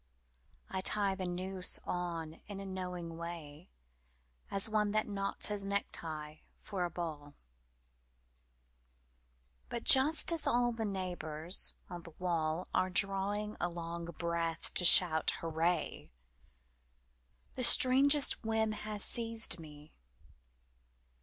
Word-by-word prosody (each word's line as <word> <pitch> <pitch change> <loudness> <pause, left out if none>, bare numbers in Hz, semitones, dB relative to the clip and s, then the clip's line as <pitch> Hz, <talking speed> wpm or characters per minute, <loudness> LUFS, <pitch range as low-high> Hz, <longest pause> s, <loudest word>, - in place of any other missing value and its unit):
I 190 - -4
tie 200 0 0
the 190 -1 -6
noose 185 +1 -1
on 170 -3 -6
in 200 -1 -9
a 195 - -9
knowing 180 -3 -8
way 170 -1 -10 0.8
As 195 +2 +2
one 210 -1 -2
that 215 0 -1
knots 200 -1 -3
his 205 -1 -2
necktie 160 -6 -6 0.2
for 190 -3 -6
a - - -5
ball; 155 -4 -9 2.3
But 235 - -7
just 300 +6 +7
as 330 -3 +5
all 240 0 0
the 225 -1 -5
neighbours 180 -4 0
on 175 -1 -9
the 170 -2 -15
wall 170 -1 -4
Are 185 - -1
drawing 200 +2 -2
a 175 - -3
long 170 0 -8
breath 170 0 -5
to - - -1
shout 165 -2 +6
'Hurray!' 165 +2 -4 1.4
The 255 - -6
strangest 275 +3 +5
whim 220 -1 -2
has 215 -1 -2
seized 230 -5 +2
me 150 -1 -15
185 Hz, 115 wpm, -31 LUFS, 170-210 Hz, 2.3 s, just